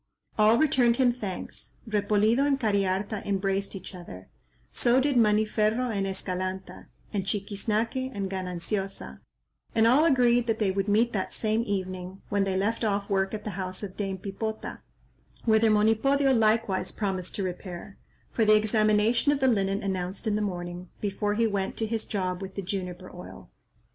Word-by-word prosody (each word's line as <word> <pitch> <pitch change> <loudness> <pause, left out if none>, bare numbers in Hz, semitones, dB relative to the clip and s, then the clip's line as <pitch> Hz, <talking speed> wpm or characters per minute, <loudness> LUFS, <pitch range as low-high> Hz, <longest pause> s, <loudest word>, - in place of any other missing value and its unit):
All 215 +2 +5
returned 250 -5 +3
him 250 -2 +4
thanks. 205 -7 -6
Repolido 210 +2 +2
and 280 -1 +2
Cariharta 200 -1 0
embraced 195 0 -1
each 190 +1 -8
other; 95 - -10 0.4
so 245 +2 +3
did 280 +1 +1
Maniferro 215 +2 +2
and 195 -2 -1
Escalanta, 185 0 -4 0.3
and 200 -2 0
Chiquiznaque 215 +6 -1
and 200 -5 -3
Gananciosa; 185 - -3 0.6
and 225 - +4
all 255 +7 +5
agreed 245 -5 +4
that 225 -1 +1
they 210 -4 +1
would 195 +1 -1
meet 225 +4 +2
that 190 -3 -2
same 220 0 0
evening, 185 -1 -4
when 200 -1 +1
they 190 -1 0
left 220 +5 0
off 200 -1 -1
work 195 +1 +1
at 210 - -7
the 210 - -4
house 185 +1 -4
of 195 -2 -6
Dame 195 -2 -3
Pipota, 215 +3 -5 0.7
whither 220 0 +4
Monipodio 225 +6 +3
likewise 220 -4 +2
promised 190 -4 -3
to 200 - -2
repair, 185 +1 -6 0.3
for 230 - +1
the 215 0 +6
examination 215 +4 +3
of 290 - 0
the 265 - +3
linen 195 -4 +1
announced 190 -1 -3
in 215 -2 +1
the 210 - 0
morning, 175 -2 -4
before 205 0 -1
he 230 +1 +2
went 200 -3 -2
to 225 - 0
his 220 0 -3
job 185 -2 -2
with 195 0 -7
the 200 - -4
juniper 185 -1 -5
oil. 180 - -11
205 Hz, 165 wpm, -27 LUFS, 190-225 Hz, 0.7 s, the